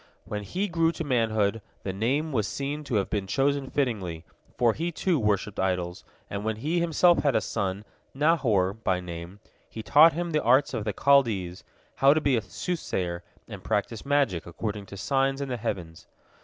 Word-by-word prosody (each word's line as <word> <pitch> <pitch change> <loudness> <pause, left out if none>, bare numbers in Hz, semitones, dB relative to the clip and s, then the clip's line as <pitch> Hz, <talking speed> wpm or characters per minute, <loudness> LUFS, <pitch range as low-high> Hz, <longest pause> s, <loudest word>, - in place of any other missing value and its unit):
When 105 -1 -4
he 185 - -2
grew 165 -2 +2
to 165 - -4
manhood, 115 -5 +1 0.2
the 95 - -3
name 135 +10 0
was 110 -6 0
seen 145 +2 -4
to 125 - -2
have 100 -2 +1
been 100 -2 -1
chosen 135 +4 0
fittingly, 95 - -2 0.3
for 120 -2 +3
he, 170 +6 -2
too, 170 -1 0
worshipped 105 -2 0
idols, 90 -2 -1 0.2
and 100 0 -5
when 110 0 -1
he 155 +10 -1
himself 170 +1 +4
had 140 -4 +1
a - - +5
son, 100 +2 -3 0.3
Nahor 130 - +2
by 95 -4 -1
name, 90 +2 -8 0.3
he 110 - -7
taught 160 +7 +7
him 170 +2 -3
the 155 -1 +1
arts 130 +5 +3
of 110 -4 -3
the 105 - -1
Chaldees, 110 -11 +2 0.3
how 140 +2 +5
to - - +3
be 140 -4 +2
a 115 - +1
soothsayer 95 - -3 0.3
and - - -9
practice 105 +2 -2
magic 140 - +1
according 100 +3 -5
to 100 - -9
signs 135 +7 0
in 140 -1 -4
the 125 - -2
heavens. 90 -8 -5
115 Hz, 185 wpm, -27 LUFS, 100-145 Hz, 0.3 s, taught